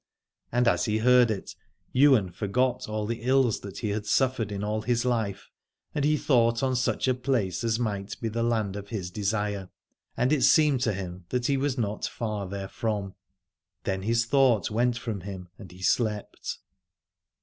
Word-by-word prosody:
And 120 0 +2
as - - +3
he 110 -1 +1
heard 125 +1 +5
it 105 -3 -4 0.4
Ywain 130 -9 +5
forgot 125 +7 -1
all 110 0 -2
the 115 +1 -3
ills 130 -2 +2
that 100 0 -9
he 110 - -2
had 105 0 -3
suffered 125 -4 +1
in 100 0 -3
all 105 +1 -1
his 120 +1 0
life, 110 -6 -1 0.5
and 150 - -1
he 150 +1 +3
thought 120 -3 +2
on 130 -1 +1
such 125 +1 0
a 130 - +4
place 120 -7 -1
as 115 -1 +1
might 100 -4 -3
be 115 - -2
the 115 +1 -2
land 110 -4 0
of 100 -1 -6
his 95 -5 -4
desire: 105 -1 -2 0.5
and 130 +4 +2
it 145 - +2
seemed 150 -6 +5
to 110 -4 +1
him 90 -2 -6
that 125 -1 -1
he 140 - +2
was 135 0 0
not 105 -3 -2
far 105 -4 -4
therefrom. 100 0 -3 0.7
Then 95 0 -2
his 115 +3 +1
thought 120 -6 +3
went 120 +2 +1
from 110 -5 -4
him 90 -1 -8
and 95 - -11
he 90 +1 -12
slept. 105 +3 -1
110 Hz, 180 wpm, -27 LUFS, 100-125 Hz, 0.7 s, heard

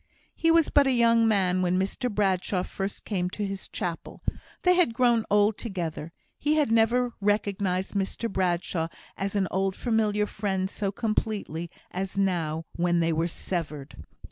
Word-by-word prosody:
He 330 - +1
was 330 -1 +4
but 285 -1 +5
a - - +3
young 230 -2 +4
man 185 -4 +2
when 180 0 +2
Mr 200 +7 -1
Bradshaw 190 -3 0
first 195 +1 -5
came 180 -4 -1
to 205 +2 -3
his 195 -1 -5
chapel; 170 -2 -5 0.4
they 360 - +6
had 350 -11 +3
grown 240 -3 +3
old 205 +1 +3
together; 170 -7 -4 0.3
he 300 +1 +2
had 295 -7 +2
never 235 +2 +3
recognised 200 -2 0
Mr 200 +3 -1
Bradshaw 175 -4 0 0.3
as 195 +1 -3
an 195 -2 +2
old 190 0 0
familiar 215 -3 +1
friend 195 -2 -2
so 200 -2 -2
completely 205 -6 -2 0.2
as 190 +1 -4
now 165 -5 0
when 175 0 +2
they 165 0 +2
were 165 +2 +1
severed. 150 - -4
195 Hz, 160 wpm, -27 LUFS, 180-225 Hz, 0.4 s, they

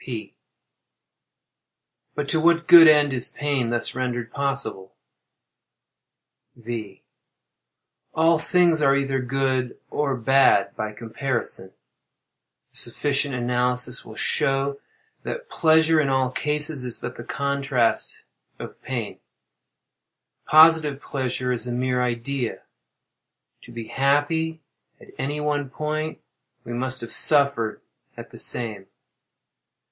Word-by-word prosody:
P. 120 -4 -7 1.8
But 150 -1 -3
to 160 - +2
what 170 +1 +3
good 170 -2 +9
end 150 -2 +5
is 125 -2 0
pain 140 -5 -2
thus 120 0 0
rendered 120 -2 -3
possible? 135 -9 -3 1.6
V. 110 -4 -7 1.1
All 165 0 +3
things 170 -1 +2
are 140 -1 +4
either 135 -1 -1
good 130 -1 -1
or 140 -2 -1
bad 135 +3 +3
by 110 0 -4
comparison. 115 -3 -4 1.0
A - - -23
sufficient 140 -1 0
analysis 125 0 0
will 110 - -12
show 135 +3 0 0.4
that - - -6
pleasure, 160 0 +3
in 140 - -1
all 130 -1 +1
cases, 150 0 -2
is 125 -2 -4
but - - -7
the 120 - -9
contrast 140 -3 -1 0.4
of - - -10
pain. 120 -5 -5 1.3
Positive 155 -2 +5
pleasure 130 -2 -3
is 125 -1 -2
a - - -3
mere 125 +1 -1
idea. 125 +1 -3 1.0
To - - -13
be 115 -1 -8
happy 155 +4 0 0.4
at - - -17
any 145 +3 -2
one 145 -2 -2
point 155 +2 -4 0.5
we 120 - -7
must 130 +1 -3
have 115 - -6
suffered 140 -7 +3 0.4
at - - -10
the - - -10
same. 110 -5 -2
135 Hz, 115 wpm, -23 LUFS, 120-150 Hz, 1.8 s, good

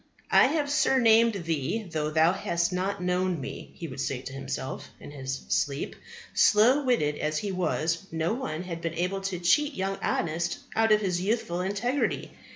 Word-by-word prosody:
"I - - +7
have 295 +1 0
surnamed 230 -5 +4
thee 165 +7 -1
though 155 -2 -2
thou 160 +3 +4
hast 170 -2 -1
not 190 +1 -2
known 180 -1 0
Me," 135 - -7
he 170 - -6
would 130 -2 -6
say 135 -2 -2
to 135 0 -8
himself 135 -1 -5
in - - -10
his 135 -2 -5
sleep. 140 0 -1 0.4
Slow 245 +7 +5
witted 150 - +1
as 155 0 -1
he 200 +4 -2
was, 175 -1 -1
no 165 +3 0
one 175 -10 -4
had 170 -2 -6
been 165 -1 -3
able 180 +3 -1
to 195 -2 -3
cheat 275 - +2
young 195 +1 -2
Honest 170 +1 -1 0.2
out 225 0 +3
of 215 0 +5
his 180 -3 0
youthful 190 -4 -1
integrity. 215 +9 -1
180 Hz, 175 wpm, -27 LUFS, 155-210 Hz, 0.4 s, I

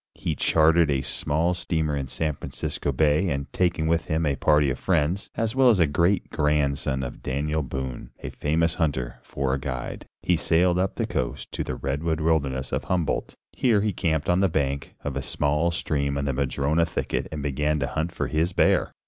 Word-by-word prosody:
He - - -2
chartered 80 0 +4
a 70 -2 +1
small 80 +7 0
steamer 80 -4 -1
in 70 -2 -3
San 75 +4 -1
Francisco 70 - -3
Bay 75 +6 +2
and 70 -2 -2
taking 85 -3 +1
with 80 +1 +1
him 80 +1 0
a 70 -2 +1
party 75 -1 +3
of 65 - -4
friends, 85 +2 0
as 115 +1 -1
well 130 -1 +6
as 110 -5 +4
a 85 - +6
great 85 +6 +1
grandson 70 -2 +1
of 60 - -6
Daniel 75 +4 -1
Boone, 65 -3 -5
a - - -4
famous 80 +3 +1
hunter, 65 -8 -2
for 65 +1 -2
a 70 - 0
guide, 65 -2 -5 0.2
he 90 - +3
sailed 85 +1 +3
up 95 +1 0
the - - -1
coast - - -3
to - - -2
the - - -4
redwood 75 +4 -2
wilderness 70 -5 0
of - - -2
Humboldt. 90 -4 -1 0.2
Here 115 -5 +3
he 105 -1 0
camped 80 -4 0
on 90 +1 +3
the 95 -1 +3
bank 70 -3 -2
of 70 -2 -3
a 70 - -1
small 75 +4 +1
stream 75 -5 -1
in 70 0 -1
a 70 - 0
madrona 70 +5 +1
thicket - - -2
and 75 -2 -4
began 75 +2 0
to - - +1
hunt 80 +5 -2
for 75 - -2
his 80 +7 0
bear. - - +2
75 Hz, 200 wpm, -25 LUFS, 70-85 Hz, 0.2 s, well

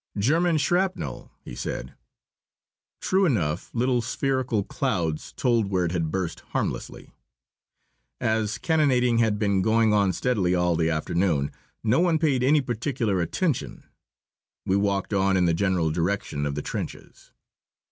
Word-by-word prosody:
"German 160 - +2
shrapnel!" 180 +6 -1
he - - -9
said. - - -5 1.1
True 190 +1 +2
enough, 90 - -1
little 125 +1 +1
spherical 125 -3 -1
clouds 80 -5 -2
told 115 -4 +1
where 90 -2 +1
it 85 - -2
had 85 -3 -1
burst 90 -1 -3
harmlessly. - - -4 1.1
As 110 -1 0
cannonading 130 -7 +2
had 110 -3 +2
been 100 -2 +1
going 110 +1 +3
on 100 -2 +3
steadily 95 -6 0
all 90 -1 +2
the 80 0 +1
afternoon, 80 -2 0 0.3
no 115 +5 +3
one 170 -2 +3
paid 145 -5 +1
any 145 +4 +4
particular 120 - -1
attention. 150 - -2 0.8
We 95 - +1
walked 100 0 0
on 95 -1 +2
in 90 - +3
the 85 - +2
general 85 -2 +1
direction 85 -3 -1
of 70 - -3
the 75 - -3
trenches. - - -7
105 Hz, 135 wpm, -25 LUFS, 90-125 Hz, 1.1 s, any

